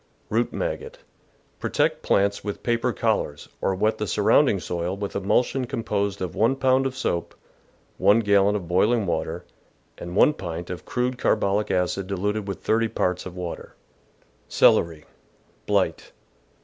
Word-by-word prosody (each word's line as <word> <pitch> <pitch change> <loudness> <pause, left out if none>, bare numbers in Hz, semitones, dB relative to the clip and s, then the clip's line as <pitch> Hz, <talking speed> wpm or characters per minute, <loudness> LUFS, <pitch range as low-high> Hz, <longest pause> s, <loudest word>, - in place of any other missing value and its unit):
Root - - +1
Maggot. - - -4 0.3
— - - -38
Protect - - 0
plants 100 0 +1
with 105 -1 -5
paper 120 +1 +1
col 110 -2 +1
lars, 75 0 -7
or 95 - +1
wet 110 +3 0
the 105 - -2
surrounding - - +3
soil 90 +2 -3
with 100 0 -5
emulsion 125 +6 +1
com 115 -1 -4
posed 100 -2 -1
of 90 - -4
one 115 +7 +2
pound 130 0 +2
of 130 -1 -7
soap, 85 -8 -2 0.6
one 105 +3 +5
gallon 100 -1 +3
of 95 -5 -4
boiling 105 +5 +2
water, 85 0 -3 0.5
and 85 +1 -7
one 150 - +5
pint 85 - -6
of 90 - -7
crude 125 0 -2
carbolic 105 0 +1
acid 95 +1 0
diluted 100 +2 -2
with 100 - -5
thirty 115 +1 +2
parts 90 -4 -1
of 90 - -10
water. 90 -2 -6 0.7
Celery. 80 -2 +3 0.3
— - - -37
Blight. - - 0
100 Hz, 160 wpm, -24 LUFS, 90-115 Hz, 0.7 s, one